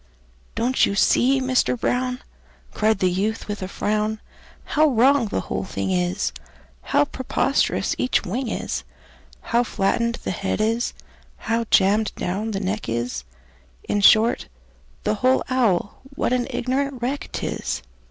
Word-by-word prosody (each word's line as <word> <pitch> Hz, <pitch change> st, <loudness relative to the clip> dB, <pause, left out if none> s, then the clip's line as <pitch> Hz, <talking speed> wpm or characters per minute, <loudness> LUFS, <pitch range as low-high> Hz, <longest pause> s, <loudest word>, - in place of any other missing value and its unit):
"Don't 250 Hz, +3 st, +2 dB
you 200 Hz, -, -2 dB
see, 265 Hz, +6 st, +4 dB
Mister 255 Hz, -1 st, +1 dB
Brown," 250 Hz, +1 st, -1 dB, 0.5 s
Cried 215 Hz, 0 st, +2 dB
the 185 Hz, -1 st, +2 dB
youth, 210 Hz, +5 st, -1 dB
with 205 Hz, -1 st, -4 dB
a 185 Hz, -, -3 dB
frown, 215 Hz, +2 st, -1 dB, 0.4 s
"How 310 Hz, +1 st, +3 dB
wrong 260 Hz, -1 st, +4 dB
the 95 Hz, -, -2 dB
whole -, -, -3 dB
thing 95 Hz, 0 st, -3 dB
is, 90 Hz, -9 st, 0 dB, 0.5 s
How 145 Hz, -, +2 dB
preposterous 265 Hz, -, 0 dB
each 255 Hz, -, +1 dB
wing 240 Hz, +8 st, -2 dB
is, -, -, -3 dB, 0.6 s
How 235 Hz, +1 st, +1 dB
flattened 235 Hz, +2 st, 0 dB
the -, -, -2 dB
head 190 Hz, +3 st, -2 dB
is, 225 Hz, +2 st, 0 dB, 0.4 s
how 230 Hz, 0 st, -1 dB
jammed 205 Hz, +3 st, +3 dB
down 200 Hz, +5 st, -2 dB
the 200 Hz, -3 st, -2 dB
neck 200 Hz, -, -3 dB
is 120 Hz, -, -3 dB, 0.6 s
In 205 Hz, -, -1 dB
short, 220 Hz, +3 st, +5 dB, 0.6 s
the -, -, +1 dB
whole 255 Hz, +1 st, +3 dB
owl, 215 Hz, -7 st, +1 dB, 0.2 s
what 250 Hz, -, 0 dB
an 250 Hz, -1 st, 0 dB
ignorant 265 Hz, +2 st, -1 dB
wreck 260 Hz, +4 st, -3 dB
't -, -, -3 dB
is! -, -, -3 dB
220 Hz, 145 wpm, -23 LUFS, 195-250 Hz, 0.6 s, short